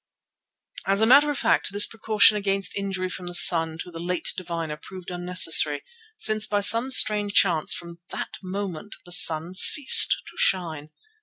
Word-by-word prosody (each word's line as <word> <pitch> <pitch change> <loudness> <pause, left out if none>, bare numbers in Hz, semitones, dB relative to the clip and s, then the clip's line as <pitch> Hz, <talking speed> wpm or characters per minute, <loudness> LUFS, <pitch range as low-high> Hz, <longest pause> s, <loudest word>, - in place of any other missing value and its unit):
As 195 +1 0
a - - +3
matter 280 +5 +3
of 290 - -5
fact, - - -2
this 205 +1 +2
precaution 220 -1 +1
against 195 -2 -2
injury 195 -2 -5
from 185 0 -10
the 175 - -6
sun 165 -2 +5
to 180 - -15
the 165 - -11
late 175 +1 -5
diviner 165 -4 -7
proved 180 +3 -13
unnecessary, 175 -4 0 0.3
since 215 0 -1
by 205 -1 -3
some 230 +5 +2
strange 210 -5 +3
chance 170 -5 +1
from 170 -1 -10 0.2
that - - -8
moment 195 0 -8
the 175 - -14
sun 165 0 +1
ceased 260 +8 +5 0.2
to - - -24
shine. 160 -5 -2
185 Hz, 165 wpm, -22 LUFS, 170-205 Hz, 0.3 s, sun